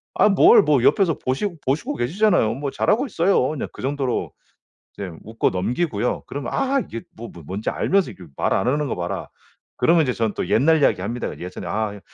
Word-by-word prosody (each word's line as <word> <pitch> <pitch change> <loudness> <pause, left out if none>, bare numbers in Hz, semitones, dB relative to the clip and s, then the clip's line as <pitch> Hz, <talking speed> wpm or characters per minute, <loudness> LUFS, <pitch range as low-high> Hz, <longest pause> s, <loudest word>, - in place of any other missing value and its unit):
"아 - - +5
뭘 195 - +7
뭐 145 -5 +2
옆에서 170 -2 +3
보시고 165 +8 -2
보시고 140 +3 -1
계시잖아요. 170 - +2
뭐 140 +1 -3
잘하고 235 +6 +1
있어요." 170 - +2
그냥 155 - -4
그 - - -10
정도로 135 -2 -2 0.6
이제 100 -2 -5
웃고 110 +2 -1
넘기고요. 120 - -1
그러면 140 -1 -5
"아 275 0 +1
이게 115 - -7
뭐 115 +1 -8
뭐 85 - -13
뭔지 100 +6 -3
알면서 195 -1 +1
이게 95 - -13
말 - - +1
안 95 +5 0
하는 145 +3 +1
거 - - -2
봐라." 85 0 -4 0.5
그러면 165 -1 +4
이제 125 -3 0
전 110 -3 -1
또 - - -3
옛날 155 +6 +4
이야기 115 - +3
합니다. 115 +6 -3
"예전에 90 +1 -7
아 105 -1 -2
130 Hz, 390 characters per minute, -22 LUFS, 110-165 Hz, 0.6 s, 뭘